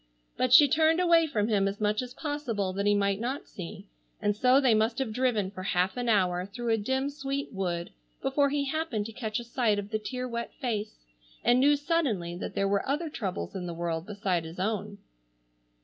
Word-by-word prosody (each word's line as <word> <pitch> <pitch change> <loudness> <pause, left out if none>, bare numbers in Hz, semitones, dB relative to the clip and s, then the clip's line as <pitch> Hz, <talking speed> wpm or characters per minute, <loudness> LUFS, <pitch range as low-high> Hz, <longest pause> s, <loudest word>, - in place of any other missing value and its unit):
But 255 -1 0
she 290 +3 +9
turned 320 +4 +3
away 335 -2 +5
from 215 -8 0
him 200 -3 +2
as 200 +1 -3
much 210 +1 +1
as 250 0 -8
possible 240 -11 -2
that 200 +2 -1
he 205 - +4
might 200 -1 +1
not 255 +5 -3
see, 185 +2 -8 0.3
and 205 -1 +1
so 255 +4 +5
they 260 -5 +4
must 220 +2 +2
have 260 -5 -2
driven 225 -6 +1
for 185 - -8
half 185 0 0
an 245 -1 -2
hour 180 -4 +2
through 235 +4 -5
a - - +3
dim 265 +6 -1
sweet 275 -2 -4
wood 175 -3 -2 0.3
before 280 +1 +2
he 285 0 0
happened 275 -7 -2
to 225 - -6
catch 220 -2 -3
a - - -6
sight 235 -3 +1
of 205 +1 -5
the 215 - 0
tear 255 +3 -4
wet 235 -1 -5
face, 215 - -4 0.4
and 245 +1 +4
knew 290 +3 +5
suddenly 280 - -1
that 175 - -6
there 195 - +1
were 200 +4 0
other 305 +3 -1
troubles 195 - -4
in 180 -2 -4
the 170 - -5
world 170 0 -3
beside 195 -5 -1
his 165 +2 -9
own. 205 0 -2
220 Hz, 210 wpm, -28 LUFS, 195-265 Hz, 0.4 s, she